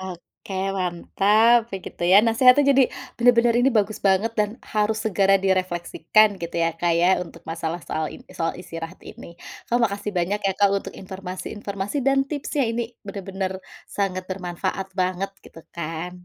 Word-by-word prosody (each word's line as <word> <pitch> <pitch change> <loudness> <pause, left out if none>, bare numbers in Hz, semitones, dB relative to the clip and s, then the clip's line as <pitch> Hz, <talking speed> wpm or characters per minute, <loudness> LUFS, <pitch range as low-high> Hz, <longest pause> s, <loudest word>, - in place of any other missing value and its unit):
Oke, 190 +1 -10 0.2
mantap, 210 +6 +3
ya, - - -1
gitu, - - -8
ya. - - +9
Nasehatnya 250 +4 +5
jadi 270 0 +5 0.4
bener-bener 235 0 +5
ini, 255 - +4
bagus 210 +1 -1
banget, 195 +4 +2
dan 210 -1 +2 0.2
harus 215 +1 +1
segera 195 -2 +3
direfleksikan, 185 +2 +2
gitu 170 - -6
ya, 165 - +2
Kak, 175 -1 +2
ya, 175 +1 +4 0.2
untuk 170 -1 -14
masalah 165 +1 -4
soal 155 0 -2
in - - -13
soal 165 0 -1
istirahat 165 0 -8
ini. 170 - -11 0.3
Kak, 240 - +2
makasih 205 -1 -1
banyak 195 +4 0
ya, 195 - +2
Kak, 200 -1 +4
untuk 200 - -3
informasi-informasi 195 +3 -6
dan 275 0 +4
tipsnya, 290 -1 -1
ini 235 +1 -1 0.2
bener-bener 195 -1 -4 0.4
sangat 185 -2 -1
bermanfaat 185 +1 -3
banget, 185 +1 0 0.2
gitu, 165 - -13 0.2
kan. 170 +2 -5
195 Hz, 155 wpm, -23 LUFS, 180-215 Hz, 0.4 s, ya